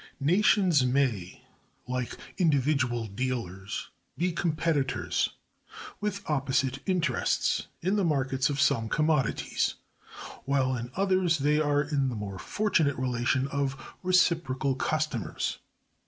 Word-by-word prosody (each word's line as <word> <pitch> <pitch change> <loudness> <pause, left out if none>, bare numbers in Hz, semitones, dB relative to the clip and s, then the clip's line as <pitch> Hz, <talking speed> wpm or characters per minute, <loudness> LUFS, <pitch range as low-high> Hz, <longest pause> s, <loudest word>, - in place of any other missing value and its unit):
Nations 175 0 +4
may, 125 -8 0 0.4
like 125 -1 -3 0.2
individual 135 -7 +2
dealers, 105 -4 -4 0.3
be 180 +3 +1
competitors, 160 -4 0 0.7
with 210 -1 -3
opposite 135 -2 0
interests, 165 -10 +1
in 190 +4 +1
the 200 - +2
markets 135 -5 +1
of 145 -1 -2
some 115 -4 +2
commodities, 150 -5 +1 0.7
while 130 -2 +1
in 120 0 -5
others 185 -3 +2
they 150 +2 +2
are 145 -1 +2
in 140 -3 0
the 120 - -4
more 100 -3 -5
fortunate 160 - +1
relation 130 +1 0
of 140 -1 -3
reciprocal 165 -7 +2
customers. 155 -4 -2
140 Hz, 110 wpm, -28 LUFS, 130-165 Hz, 0.7 s, Nations